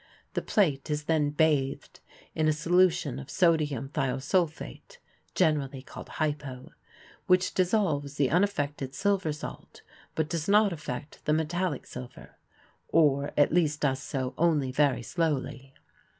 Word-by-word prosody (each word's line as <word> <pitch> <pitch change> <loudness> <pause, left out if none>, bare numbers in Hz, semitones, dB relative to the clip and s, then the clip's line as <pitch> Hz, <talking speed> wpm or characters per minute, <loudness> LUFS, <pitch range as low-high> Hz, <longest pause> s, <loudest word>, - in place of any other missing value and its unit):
The - - -1
plate 155 -10 +1
is 150 0 -1
then 150 -2 +1
bathed 145 -3 0 0.3
in 155 0 +1
a 155 - +4
solution 165 -4 +2
of 140 0 -9
sodium 150 -7 +1
thiosulphate 150 - -2 0.4
(generally 145 -6 +1
called - - -10
"hypo"), 145 -4 -3 0.6
which 185 0 +3
dissolves 175 -7 +1
the 140 -3 +1
unaffected 145 -7 0
silver 195 -5 +1
salt 150 - -9 0.3
but 160 -1 0
does 165 -1 -3
not 205 -1 +5
affect 145 -2 -7
the 150 - +2
metallic 160 0 -1
silver 125 -1 -10 0.5
or 145 -3 +3
at 145 +1 +4
least 155 -4 +2
does 135 -2 +1
so 130 -2 -3
only 150 -6 +2
very 135 -2 +2
slowly. 140 -4 -2
150 Hz, 130 wpm, -28 LUFS, 140-170 Hz, 0.6 s, not